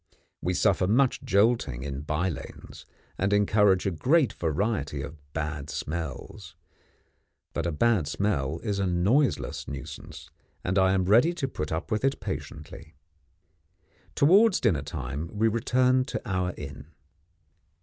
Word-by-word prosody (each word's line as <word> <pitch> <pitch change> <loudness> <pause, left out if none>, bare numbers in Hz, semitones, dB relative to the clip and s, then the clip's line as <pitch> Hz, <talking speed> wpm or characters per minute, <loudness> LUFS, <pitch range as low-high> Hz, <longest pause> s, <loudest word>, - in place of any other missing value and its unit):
We 90 +1 -1
suffer 95 -2 +2
much 125 +5 +2
jolting 100 - +1
in 70 -1 -4
by 75 +5 -1
lanes, 80 -7 -8 0.3
and 100 +1 +1
encounter 105 0 +4
a - - +1
great 135 - +2
variety 80 -4 -1
of 75 +2 -7 0.2
bad 75 -2 -4
smells. 80 -3 -6 1.0
But 85 0 -2
a - - 0
bad 95 0 +2
smell 75 -4 -1
is 105 -3 -1
a 100 - +1
noiseless 100 +11 +1
nuisance, 70 -1 -8 0.3
and 95 +2 +1
I 95 0 +4
am 95 -1 +1
ready 120 - +5
to 170 -6 -2
put 75 - -5
up 80 +1 -3
with 110 +2 0
it 135 0 +1
patiently. 75 +1 -7 1.2
Towards 195 +8 +5
dinner 95 - +2
time 70 +1 -5
we 110 +2 +3
return 125 +3 +2
to 150 - -4
our 90 -2 -1
inn. 70 0 -8
95 Hz, 140 wpm, -27 LUFS, 75-115 Hz, 1.2 s, ready